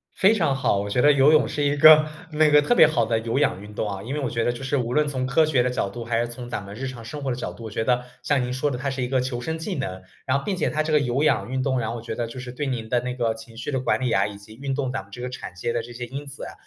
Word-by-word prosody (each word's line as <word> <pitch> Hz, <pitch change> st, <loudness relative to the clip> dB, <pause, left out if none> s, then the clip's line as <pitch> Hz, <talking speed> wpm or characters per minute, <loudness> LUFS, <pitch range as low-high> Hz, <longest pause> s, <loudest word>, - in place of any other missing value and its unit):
非 200 Hz, +3 st, +5 dB
常 145 Hz, -9 st, +1 dB
好， 135 Hz, -6 st, +1 dB
我 100 Hz, -, -3 dB
觉 125 Hz, +5 st, +1 dB
得 145 Hz, +2 st, +6 dB
游 140 Hz, +1 st, +5 dB
泳 155 Hz, -, +4 dB
是 145 Hz, -, -2 dB
一 145 Hz, 0 st, +2 dB
个 155 Hz, +1 st, +8 dB, 0.3 s
那 155 Hz, 0 st, +4 dB
个 150 Hz, 0 st, +7 dB
特 245 Hz, -, +2 dB
别 160 Hz, -, +8 dB
好 155 Hz, -, +1 dB
的 115 Hz, 0 st, +1 dB
有 115 Hz, +4 st, -1 dB
氧 140 Hz, -9 st, +1 dB
运 105 Hz, 0 st, -11 dB
动 105 Hz, -, -2 dB
啊， 100 Hz, -1 st, -5 dB
因 125 Hz, +5 st, -5 dB
为 150 Hz, -, -2 dB
我 130 Hz, -4 st, -1 dB
觉 115 Hz, -1 st, -1 dB
得 120 Hz, -, +1 dB
就 120 Hz, -, -8 dB
是 135 Hz, +2 st, 0 dB
无 120 Hz, -1 st, -2 dB
论 150 Hz, 0 st, +2 dB
从 130 Hz, -2 st, -2 dB
科 135 Hz, +5 st, +3 dB
学 145 Hz, -5 st, +2 dB
的 125 Hz, -, +1 dB
角 100 Hz, -, -1 dB
度， 115 Hz, +4 st, -7 dB
还 115 Hz, 0 st, 0 dB
是 120 Hz, -, 0 dB
从 120 Hz, 0 st, -8 dB
咱 105 Hz, -, -4 dB
们 100 Hz, +1 st, -9 dB
日 135 Hz, +4 st, -5 dB
常 120 Hz, -3 st, -8 dB
生 150 Hz, +6 st, -7 dB
活 135 Hz, -, -1 dB
的 -, -, -1 dB
角 125 Hz, -, -4 dB
度， 115 Hz, -, -12 dB
我 110 Hz, -, -7 dB
觉 110 Hz, -, -1 dB
得 125 Hz, 0 st, +1 dB, 0.2 s
像 135 Hz, +1 st, +1 dB
您 125 Hz, -, -3 dB
说 140 Hz, +3 st, 0 dB
的 125 Hz, -, -3 dB
它 135 Hz, +2 st, -2 dB
是 130 Hz, -, -4 dB
一 125 Hz, -, 0 dB
个 130 Hz, 0 st, +1 dB
求 125 Hz, -1 st, -3 dB
生 160 Hz, +5 st, -3 dB
技 185 Hz, +4 st, -4 dB
能。 95 Hz, -9 st, -4 dB, 0.2 s
然 135 Hz, +1 st, +2 dB
后 -, -, -5 dB
并 200 Hz, -2 st, -1 dB
且 -, -, 0 dB
它 155 Hz, 0 st, 0 dB
这 155 Hz, 0 st, -2 dB
个 150 Hz, -, +6 dB
有 135 Hz, +2 st, 0 dB
氧 140 Hz, -, +2 dB
运 130 Hz, 0 st, -1 dB
动， 130 Hz, -2 st, +1 dB
然 110 Hz, -, -2 dB
后 115 Hz, -, -4 dB
我 115 Hz, -, -6 dB
觉 110 Hz, -, -5 dB
得 120 Hz, 0 st, -2 dB
就 115 Hz, +3 st, -8 dB
是 125 Hz, 0 st, -7 dB
对 140 Hz, +3 st, -3 dB
您 115 Hz, -4 st, -3 dB
的 120 Hz, 0 st, +2 dB
那 125 Hz, 0 st, -3 dB
个 115 Hz, -3 st, 0 dB
情 115 Hz, 0 st, -13 dB
绪 125 Hz, +5 st, -4 dB
的 130 Hz, -, 0 dB
管 130 Hz, -, +1 dB
理 130 Hz, -2 st, 0 dB
呀， -, -, +2 dB
以 100 Hz, -1 st, -8 dB
及 100 Hz, +2 st, -14 dB
运 135 Hz, +2 st, -3 dB
动 130 Hz, -2 st, -1 dB
咱 135 Hz, -, -3 dB
们 100 Hz, -, -19 dB
这 120 Hz, -, -9 dB
个 125 Hz, 0 st, -4 dB
产生 120 Hz, -1 st, -5 dB
这 120 Hz, +1 st, -11 dB
些 120 Hz, 0 st, -6 dB
因 140 Hz, +4 st, -7 dB
子 140 Hz, -, -9 dB
啊， -, -, -8 dB
125 Hz, 390 characters per minute, -24 LUFS, 115-145 Hz, 0.3 s, 个